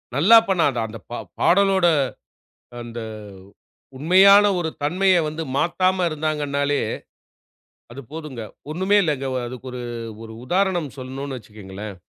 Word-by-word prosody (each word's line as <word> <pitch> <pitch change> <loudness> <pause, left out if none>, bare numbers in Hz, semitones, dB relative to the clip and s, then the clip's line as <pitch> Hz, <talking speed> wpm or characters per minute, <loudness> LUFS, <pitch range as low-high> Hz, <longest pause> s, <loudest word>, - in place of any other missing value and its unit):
நல்லா 190 +12 +7
பண்ணாத. 165 -8 +2
அந்தப் 110 -1 -11
ப - - -5 0.3
பாடலோட 190 -1 +3 0.9
அந்த 120 0 -7 1.0
உண்மையான 190 +7 +6
ஒரு 165 -2 -2
தன்மைய 185 +5 +3
வந்து 155 +2 -4
மாத்தாம 185 +3 +1
இருந்தாங்கன்னாலே 145 -2 -1 1.1
அது 135 - -8
போதுங்க. 150 -7 -7 0.3
ஒண்ணுமே 190 +6 +1
இல்லைங்க. 140 -5 -1 0.2
அதுக்கு 130 +1 -9
ஒரு 125 - -6 0.4
ஒரு 110 - -10
உதாரணம் 180 0 0
சொல்லணும்னு 135 +1 -6
வச்சுக்கோங்களேன், 105 -1 -10
155 Hz, 110 wpm, -22 LUFS, 130-185 Hz, 1.1 s, நல்லா